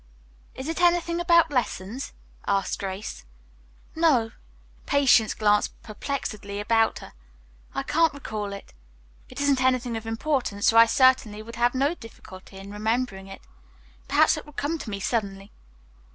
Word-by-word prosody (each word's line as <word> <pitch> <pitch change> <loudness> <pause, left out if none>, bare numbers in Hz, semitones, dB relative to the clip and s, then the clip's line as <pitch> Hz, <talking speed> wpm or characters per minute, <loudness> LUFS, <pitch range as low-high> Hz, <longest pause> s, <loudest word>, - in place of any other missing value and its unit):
"Is 265 - -6
it 325 +2 -2
anything 345 -1 +2
about 340 -2 +4
lessons?" 245 -2 -2 0.4
asked 195 -1 0
Grace. 195 - -5 0.7
"No." 280 -9 +3 0.6
Patience 275 -7 +4
glanced 210 -1 +1
perplexedly 215 -3 -5
about 225 +1 +2
her. - - -11 0.6
"I - - -1
can't 330 0 +2
recall 215 -7 -5
it. 200 0 -10 0.6
It - - -9
isn't 280 -2 +2
anything 255 -2 +1
of 225 0 -6
importance 225 -3 0
or - - +4
I 230 0 +9
certainly 235 -4 +3
would 230 +1 -10
have 240 +1 +2
no 280 +5 +2
difficulty 195 - -13
in 195 +1 -9
remembering 215 -2 -2
it. 195 - -10 0.7
Perhaps 310 +2 +4
it 305 - -7
will 295 - -13
come 310 +4 -2
to 230 - -7
me 200 -1 -4
suddenly." 195 -2 -3
230 Hz, 145 wpm, -25 LUFS, 210-285 Hz, 0.7 s, I